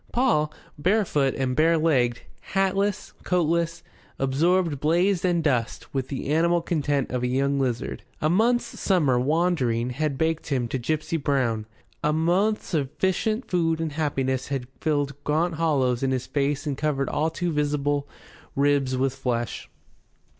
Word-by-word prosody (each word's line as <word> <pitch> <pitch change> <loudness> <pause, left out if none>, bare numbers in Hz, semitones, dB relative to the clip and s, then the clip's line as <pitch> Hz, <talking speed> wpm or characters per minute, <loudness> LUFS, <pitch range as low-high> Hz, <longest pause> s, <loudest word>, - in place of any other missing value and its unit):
Paul, 225 -12 +2 0.3
barefoot 170 -7 +2
and 130 -1 -1
barelegged, 155 -6 +2 0.3
hatless, 195 +1 0
coatless, 170 -1 0 0.3
absorbed 155 +3 +1
blaze 175 +5 +2
and 175 -3 +2
dust 125 -6 -1
with 135 -2 -1
the 135 0 -4
animal 170 +3 +3
content 145 -5 0
of 125 -1 -1
a 125 - 0
young 140 +2 +1
lizard. 125 -3 -2 0.2
A 155 - +1
month's 230 +8 +1
summer 150 -10 +2
wandering 130 -5 +1
had 140 +1 -2
baked 160 +1 0
him 130 -5 0
to 130 - -2
gipsy 155 +5 -1
brown. 125 -7 0 0.4
A 150 - +3
month's 180 +7 +1
sufficient 190 - -1
food 165 -3 +1
and 165 -1 -2
happiness 135 -4 -1
had 135 -3 -3
filled 145 -2 -1
gaunt 165 +4 +1
hollows 130 -7 +2
in 135 - +1
his 130 -1 -1
face 145 0 -1
and 145 -2 -1
covered 140 -1 -1
all 155 +2 0
too 175 +2 -2
visible 145 -1 0 0.5
ribs 140 -2 +2
with 130 0 +1
flesh. 125 -3 -3
150 Hz, 145 wpm, -25 LUFS, 135-170 Hz, 0.5 s, animal